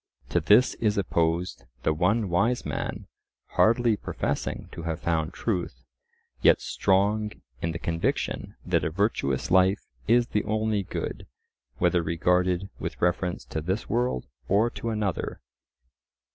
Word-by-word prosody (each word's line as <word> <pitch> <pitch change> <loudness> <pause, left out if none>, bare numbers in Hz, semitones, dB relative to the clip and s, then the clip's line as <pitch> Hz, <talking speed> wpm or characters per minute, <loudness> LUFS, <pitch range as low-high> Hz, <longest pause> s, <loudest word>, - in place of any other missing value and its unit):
To 90 - +2
this 105 +10 +5
is 105 -2 +1
opposed 85 -1 0 0.2
the 80 - +2
one 100 +7 +2
wise 110 +8 +1
man - - -3 0.4
hardly 115 0 +3
professing - - -3
to - - -7
have 80 0 -3
found 80 -1 0
truth, 90 - -3 0.6
yet - - +6
strong 105 +3 +1 0.3
in 85 - 0
the 80 - -4
conviction 85 -1 -2
that - - +1
a - - +1
virtuous 80 - 0
life 95 +2 +4 0.2
is 120 +2 +4
the 105 - 0
only 110 -1 0
good, 95 - -5 0.5
whether 90 0 +3
regarded 90 +3 +1
with - - -5
reference 90 0 0
to 80 - -1
this 95 +7 -2
world 120 - 0 0.2
or 110 +5 +3
to 115 - -4
another. 105 -4 -2
95 Hz, 135 wpm, -27 LUFS, 85-110 Hz, 0.6 s, yet